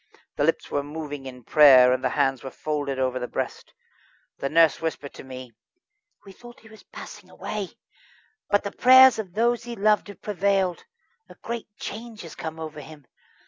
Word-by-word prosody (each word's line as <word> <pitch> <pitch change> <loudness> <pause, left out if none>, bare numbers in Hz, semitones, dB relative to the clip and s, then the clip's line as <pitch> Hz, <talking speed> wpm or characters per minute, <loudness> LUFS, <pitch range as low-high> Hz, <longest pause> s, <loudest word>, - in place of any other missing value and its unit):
The - - 0
lips - - -1
were 145 - 0
moving 145 -2 -7
in 125 -1 -11
prayer, 130 -3 +7
and 130 - -2
the - - +1
hands 135 -3 0
were 135 - -6
folded 145 -1 -3
over 130 -1 -1
the 125 - -4
breast. - - -5 0.7
The 140 - -2
nurse 165 -1 +4
whispered 160 -3 -4
to - - -11
me: 130 -2 -10 0.7
"We 195 - -12
thought 240 +5 -15
he 220 - -17
was 220 -1 -15
passing - - -12
away, - - -6 0.7
but 205 - +2
the 200 - -4
prayers 260 -1 +7
of 190 -5 -6
those 235 +2 +1
he 240 -1 -6
loved 210 +1 +2
have 205 - -13
prevailed. 195 -2 0 0.4
A - - -14
great 235 -1 -6
change 225 0 -8
has 165 - -10
come 160 0 -7
over 155 -1 -7
him. 145 0 -13
160 Hz, 185 wpm, -24 LUFS, 135-210 Hz, 0.7 s, prayer